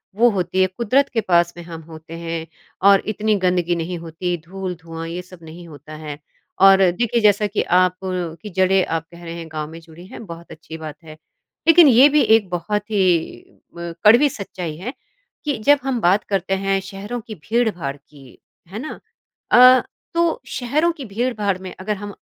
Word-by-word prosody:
वो 235 +3 +5
होती 190 -2 -1
है। 185 - +4
कुदरत 255 +5 +2
के 225 - +1
पास 175 -3 +2
में 175 - -8
हम 165 -1 -9
होते 160 0 -11
हैं 165 -1 -4 0.4
और 195 -1 +5
इतनी 215 0 0
गंदगी 180 -1 +1
नहीं 170 +1 -4
होती 170 +2 -4
धूल-धुआँ 170 -3 -6
ये 170 +2 -5
सब 180 -2 -16
नहीं 165 +2 -11
होता 150 0 -12
है। 150 -1 -8 0.4
और 195 0 +8
देखिए 235 +5 0
जैसा 210 0 +3
कि 205 - -1
आप 180 +1 +3
अ, 180 -3 -3
की 210 - -8
जड़ें 190 0 +2
आप 165 -1 -3
कह 170 0 -13
रहे 165 - -7
हैं 165 -1 -7
गाँव 155 -1 -5
में 165 - -9
जुड़ी 165 +1 -15
हैं, 225 - -10
बहुत 170 -2 -11
अच्छी 160 0 -10
बात 155 0 -9
है। 155 -1 -12 0.5
लेकिन 330 -1 +8
ये 260 +3 +7
भी 300 +1 +3
एक 220 -4 +3
बहुत 205 +5 -3
ही 185 -5 +1 0.3
म 170 0 -6
कड़वी 240 +8 +6
सच्चाई 180 - -6
है 220 +10 -6 0.5
कि 290 -3 -1
जब 290 0 +6
हम 265 -3 -1
बात 185 +4 +3
करते 195 -1 -1
हैं 195 0 +2
शहरों 200 +5 -6
की 215 -1 -9
भीड़-भाड़ 185 - -1
की, 140 -2 -18 0.3
है 195 +5 -7
ना? 310 - -7 0.5
अ, 255 +1 +8 0.3
तो 335 -1 +1
शहरों 290 +7 0
की 295 -5 -9
भीड़-भाड़ 210 -3 -1
में 185 0 -9
अगर 210 +3 -2
हम 205 0 -7
185 Hz, 190 wpm, -20 LUFS, 165-220 Hz, 0.5 s, और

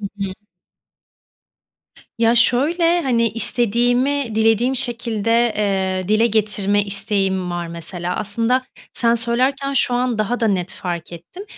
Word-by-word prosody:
Hı 205 - -7
hı. 195 -2 -4 1.9
Ya, 230 +1 +3
şöyle: 330 +9 +3
Hani, 235 -4 +1
istediğimi 245 +3 0
dilediğim 225 +4 +2
şekilde, 230 -1 +1
eee, 190 -2 -1
dile 215 +2 +3
getirme 205 -2 0
isteğim 195 -2 -1
var 175 -1 -3
mesela. 170 +2 -5
Aslında 230 +5 0 0.3
sen 235 -1 +2
söylerken 260 +4 -1
şu 245 -1 +2
an 245 -2 0
daha 235 +4 -1
da 225 - +2
net 190 -1 -1
fark 175 -3 -5
ettim. 175 - -10
225 Hz, 125 wpm, -19 LUFS, 195-245 Hz, 1.9 s, Ya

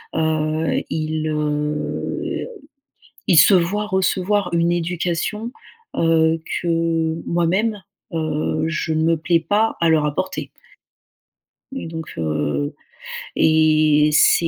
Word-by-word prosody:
heu, 160 0 0
ils 155 0 -2
heu, 150 0 -2 0.8
ils 180 - +4
se 195 - +7
voient 190 +4 +1
recevoir 190 0 0
une 170 0 +2
éducation, 175 +6 -2 0.4
heu, 165 0 +3 0.2
que 165 -1 0
moi-même, 190 +6 0 0.3
heu, 155 -1 -1
je 165 -1 -2
ne 160 - +1
me 165 0 +3
plais 165 +2 +2
pas 210 +6 +1
à 170 - +3
leur 155 -2 +3
apporter. 185 +6 -3 1.3
Et 270 - -5
donc, 160 -1 -7
heu, 75 -3 -1 0.6
et 155 -1 +4
c'est 165 +2 +4
165 Hz, 110 wpm, -20 LUFS, 155-175 Hz, 1.3 s, se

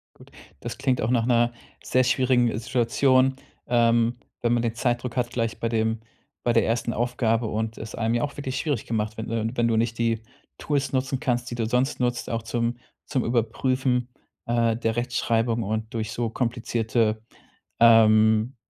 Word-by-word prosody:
Gut, - - -17 0.3
das - - -6
klingt 130 -2 +1
auch 110 - 0
nach 120 -2 +2
'ner 120 -1 +3 0.3
sehr 130 0 +2
schwierigen 125 -2 +2
Situation, 130 +3 +2 0.3
ähm, 120 0 +3 0.2
wenn 120 - +2
man 120 -1 +2
den 115 -1 -1
Zeitdruck 120 +1 -1
hat 120 -1 0
gleich 115 -2 -2
bei 115 - 0
dem 110 -1 0 0.4
bei 120 - +1
der 115 -2 +4
ersten 115 +1 -1
Aufgabe 115 -1 0
und 110 +1 -3
es 110 - -8
einem 115 0 0
ja 120 - 0
auch 145 - -2
wirklich 135 -2 -4
schwierig 145 -5 -2
gemacht 110 -1 -2
wird, 110 - -4
ne? 115 -1 -1
Wenn 120 -2 +1
du 115 - +1
nicht 115 0 0
die 115 -1 +1 0.4
Tools 140 -2 -1
nutzen 135 0 -1
kannst, 120 -4 -1
die - - -4
du 115 -2 -1
sonst 125 +5 0
nutzt, 125 0 -1
auch 115 -1 -2
zum 115 +1 -2 0.3
zum 130 -4 -1
Überprüfen, 125 +2 0 0.4
äh, 115 -1 +1
der 115 -1 -1
Rechtschreibung 115 -1 0
und 110 +1 -3
durch 110 -2 -3
so 115 -2 -2
komplizierte, 115 -2 -1 0.6
ähm, 110 +1 +5
115 Hz, 175 wpm, -25 LUFS, 115-125 Hz, 0.6 s, ähm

